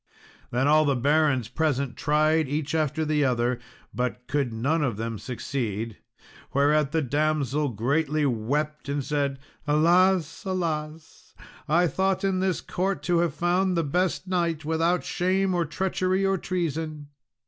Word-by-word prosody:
Then 130 +3 +1
all 155 +1 +5
the 140 -3 +2
barons 140 -2 +2
present 140 -1 -1
tried 155 0 +2
each 150 +1 -2
after 155 0 0 0.2
other, 125 -1 +1 0.3
but 125 0 -3
could 140 -3 -1
none 140 +9 0
of 125 -8 -1
them 115 -1 -4
succeed; 115 -4 -4 0.6
whereat 145 +1 +3
the 160 -1 +1
damsel 145 0 0
greatly 145 +7 0
wept, 140 +5 -1
and 140 -1 -2
said, 140 -2 -1 0.3
"Alas, 170 +3 +3
alas! 160 -4 -4 0.3
I 170 +4 +3
thought 190 +5 0
in 190 -1 +1
this 185 -1 0
court 190 +2 -2
to 175 -1 +2
have 170 -4 0
found 180 +3 +1
the 165 - +2
best 180 +5 -1
knight, 170 -4 -1
without 165 +3 +1
shame 185 +1 0
or 175 -1 +1
treachery 185 +3 0
or 195 -1 +1
treason." 160 -4 -3
155 Hz, 140 wpm, -26 LUFS, 140-175 Hz, 0.6 s, all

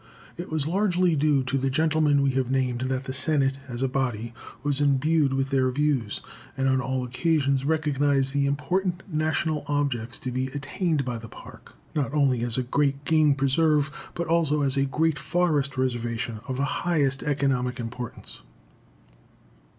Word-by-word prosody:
It 175 - -7
was 155 -3 0
largely 180 -1 +2
due 145 -2 +2
to 135 +1 -1
the 135 +1 0
gentlemen 150 0 +2
we 135 - +3
have 130 -1 -1
named 130 -2 0
that 130 0 -1
the 130 -1 -5
Senate, 135 -1 +1
as 120 0 -4
a - - +2
body, 120 -4 -2 0.3
was 145 0 0
imbued 145 +1 +3
with 135 +1 -1
their 130 -1 +3
views, 135 -5 0 0.4
and 135 0 +1
on 130 -1 +2
all 130 -1 -2
occasions 140 +1 +1
recognized 145 -3 +1
the 140 -1 +2
important 175 +6 -1
national 155 -2 -1
objects 140 -5 -1
to 130 - -3
be 130 +1 -1
attained 145 +2 -2
by 120 -2 -3
the 115 0 -10
Park, - - -13 0.2
not 145 -1 -1
only 135 -5 +2
as 120 0 -1
a 130 - +1
great 140 +2 0
game 155 -2 +4
preserve, 145 +2 +2 0.2
but 170 - -2
also 160 -3 +2
as 135 -1 +1
a 135 0 +2
great 155 +2 0
forest 150 -6 0
reservation 120 -3 -2
of 130 -1 -3
the 140 - +1 0.2
highest 145 -6 +1
economic 135 -3 0
importance. 120 0 -7
140 Hz, 165 wpm, -26 LUFS, 130-150 Hz, 0.4 s, game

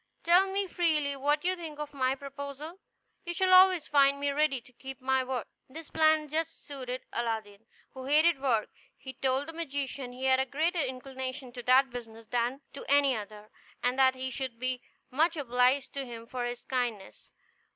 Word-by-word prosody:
Tell 365 +3 +5
me 395 +1 0
freely 310 -6 0
what 290 +3 0
you 370 +1 +2
think 325 -4 -8
of 295 -1 -6
my 260 -1 +1
proposal; 280 +5 -8 0.4
you 345 -1 -4
shall 370 +1 +3
always 370 -3 +7
find 280 -1 +4
me 285 0 0
ready 285 -2 +1
to 250 +2 -20
keep 265 +1 -9
my 265 0 +1
word." 255 -3 -3 0.2
This 315 +3 -10
plan 315 -1 +3
just 320 +2 -3
suited 255 -3 -6
Aladdin, 220 -2 -3 0.3
who 260 -1 -8
hated 305 +1 +4
work. 235 -6 +1 0.3
He 265 - -9
told 265 +1 0
the 325 - -7
magician 280 -5 -4
he 250 +1 -9
had 260 0 +4
a 265 - +2
greater 325 +5 0
inclination 260 0 -5
to 245 0 -7
that 260 +2 +4
business 230 -2 -9
than 245 +4 -1
to 280 - -8
any 280 -2 +4
other, 210 0 -8 0.3
and 250 +2 +1
that 260 -1 +5
he 260 0 -4
should 260 -2 -4
be 255 0 -2 0.3
much 320 +6 +2
obliged 255 0 +2
to 275 - -3
him 235 -3 -8
for 245 +1 -4
his 240 0 -5
kindness. 240 -6 -3
270 Hz, 185 wpm, -30 LUFS, 250-300 Hz, 0.4 s, always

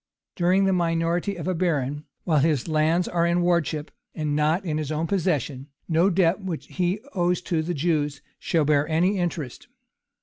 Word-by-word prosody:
During 185 +2 +3
the 190 - +3
minority 170 +2 0
of 170 -1 -6
a 185 - +1
baron, 150 -5 -1 0.2
while 155 -4 +2
his 150 -2 +1
lands 160 +3 +2
are 170 -1 0
in 170 +1 +2
wardship, 165 -3 0 0.2
and 155 -2 -2
are - - 0
not 155 +5 +1
in 155 -3 -1
his 155 -1 -3
own 155 +2 -1
possession, 155 - -1 0.2
no 170 +3 +3
debt 185 0 +2
which 175 -5 -4
he 180 +3 -1
owes 180 -1 +1
to 170 -3 -1
the 170 +2 -3
Jews 150 -2 0 0.2
shall 160 -3 +1
bear 145 0 +2
any 180 +5 +1
interest. 165 -7 -4
165 Hz, 180 wpm, -25 LUFS, 155-180 Hz, 0.2 s, During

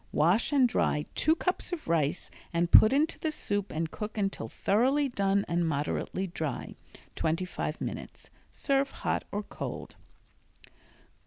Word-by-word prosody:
Wash 175 - +3
and 270 -3 +5
dry 150 -9 0
two 315 +2 +3
cups 365 +2 -1
of 350 -3 -5
rice 165 0 0 0.2
and 170 0 0
put 215 - +9
into 300 +4 +1
the 315 - -1
soup 205 -8 -2
and 160 0 -2
cook 215 +1 -6
until 195 - -2
thoroughly 260 - +2
done 200 -4 +1
and 170 0 +1
moderately 155 +5 -2
dry 160 -6 -4 0.4
(twenty 165 +3 0
five 180 - -4
minutes). - - -7 0.2
Serve 275 -1 0
hot - - -2
or 205 +1 -2
cold. - - -7
200 Hz, 145 wpm, -29 LUFS, 165-270 Hz, 0.4 s, put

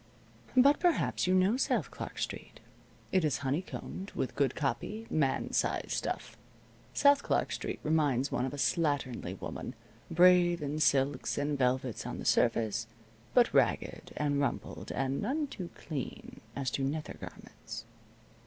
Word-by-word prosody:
But 280 +3 +6
perhaps 345 - +2
you 185 - +4
know 190 +6 +4
South - - 0
Clark - - -7
Street. - - -5 0.5
It 185 -2 +3
is 150 -4 +1
honeycombed 180 +6 -3
with 130 - -2
good 135 -3 +1
copy 150 - -2
man 140 -4 +1
size - - 0
stuff. - - -3 0.6
South 285 0 +5
Clark - - 0
Street - - -3
reminds 145 -4 +2
one 125 - 0
of 130 - -1
a 145 - -6
slatternly 145 -5 0
woman, - - -6 0.3
brave 175 0 +5
in 145 +2 -2
silks 140 -2 +2
and 145 +1 0
velvets 130 -2 0
on - - -4
the - - -6
surface, 115 -1 +2 0.5
but 245 -1 +5
ragged, - - +1
and 145 -1 +1
rumpled 140 - -3
and 135 +1 -1
none 285 +8 0
too 185 -10 -7
clean 145 -5 -6
as 135 -3 -1
to 135 - -1
nether 150 +3 -2
garments. 110 0 -9
145 Hz, 145 wpm, -31 LUFS, 135-185 Hz, 0.6 s, But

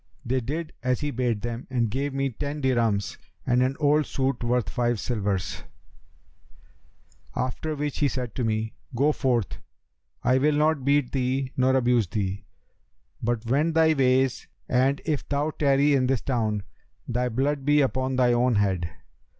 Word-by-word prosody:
They 130 +2 +1
did 155 +7 -4
as 125 +1 0
he 145 0 -1
bade 120 -4 -1
them 120 +1 -4
and 120 -4 0
gave 140 +4 -1
me 135 0 -1
ten 145 +5 -4
dirhams 115 -7 0 0.3
and 125 0 +2
an 130 +2 +1
old 150 0 +3
suit 130 -2 -1
worth 120 0 +1
five 120 -2 0
silvers; 100 -5 -2 1.7
after 130 +5 -2
which 145 -1 -3
he 145 - +3
said 125 -5 -4
to 125 - -2
me, 110 0 -1 0.2
'Go 140 +5 +3
forth; 120 -8 -1 0.6
I 130 +1 +3
will 150 +2 +2
not 150 -2 +2
beat 140 -2 +2
thee 130 0 -1
nor 130 +1 +3
abuse 120 -5 +3
thee; 95 +1 -3 0.8
but 120 0 -1
wend 150 +7 +1
thy 160 -1 +5
ways 130 -2 +2 0.2
and 130 +3 +2
if 155 -3 -2
thou 145 +2 0
tarry 140 0 +3
in 130 -2 +2
this 130 -4 +1
town, 110 -6 -1 0.4
thy 125 +1 0
blood 135 +4 0
be 145 +1 +4
upon 130 -1 0
thine 125 -1 +3
own 120 0 +2
head.' 95 -4 +1
130 Hz, 160 wpm, -26 LUFS, 120-140 Hz, 1.7 s, thy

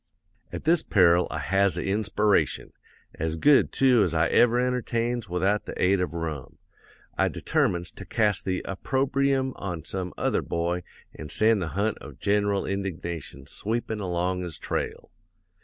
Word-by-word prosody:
"'At - - -6
this 165 +1 +3
peril 90 - +4
I - - -4
has 95 +2 +1
a - - -2
inspiration; 105 +1 +1 0.4
as 80 0 -2
good, 140 - +4
too, 130 -4 +4
as 90 -4 +1
I 80 +1 +2
ever 120 0 +4
entertains 120 -2 -1
without 95 +4 0
the - - -7
aid 95 +1 +3
of 90 -2 -3
rum. 80 -5 -5 0.6
I - - +4
determines 85 0 -1
to - - -10
cast 105 -5 +1
the 95 -1 -2
opprobrium 135 +5 0
on 85 -5 -5
some 90 -2 -4
other - - +1
boy 85 +1 -2 0.3
an' 75 - -9
send 110 +4 +3
the 85 - -2
hunt 105 +1 0
of - - -11
gen'ral 100 -1 +1
indignation 85 -7 -5
sweepin' 110 +7 -3
along 90 -1 -1
his 85 -3 -5
trail. - - -4
100 Hz, 155 wpm, -26 LUFS, 85-115 Hz, 0.6 s, peril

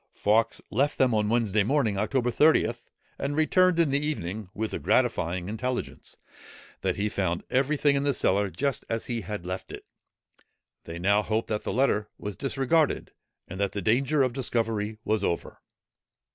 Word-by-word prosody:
Fawkes 110 +2 +1
left 140 +7 +1
them 130 -3 +3
on 105 -1 +1
Wednesday 110 -3 +2
morning, 120 -1 +1
October 120 +5 0
30th, 120 -4 +2 0.3
and 140 +1 -2
returned 180 +3 +3
in 165 -4 +3
the 140 +1 +1
evening, 105 - -3
with 110 +1 -2
the - - -3
gratifying 90 -8 +1
intelligence, 125 +4 -4 0.6
that - - 0
he 100 +1 -1
found 90 -4 -2
every 135 +4 +2
thing 145 0 +3
in 140 - 0
the 145 - +2
cellar 100 -5 +1
just 140 +6 -2
as 115 0 -2
he 120 -2 -3
had 105 -4 -6
left 90 +1 -5
it. - - -9 1.0
They 85 0 -7
now 100 +4 +3
hoped 110 +1 -2
that 105 -1 -1
the - - -2
letter 110 -5 +1
was 105 -1 -6
disregarded, 140 +3 0 0.4
and 95 - -8
that 100 -1 0
the 100 - -2
danger 135 +7 +2
of 130 -2 0
discovery 115 -4 -1
was 110 -2 0
over. 85 - -3
115 Hz, 175 wpm, -27 LUFS, 105-135 Hz, 1.0 s, them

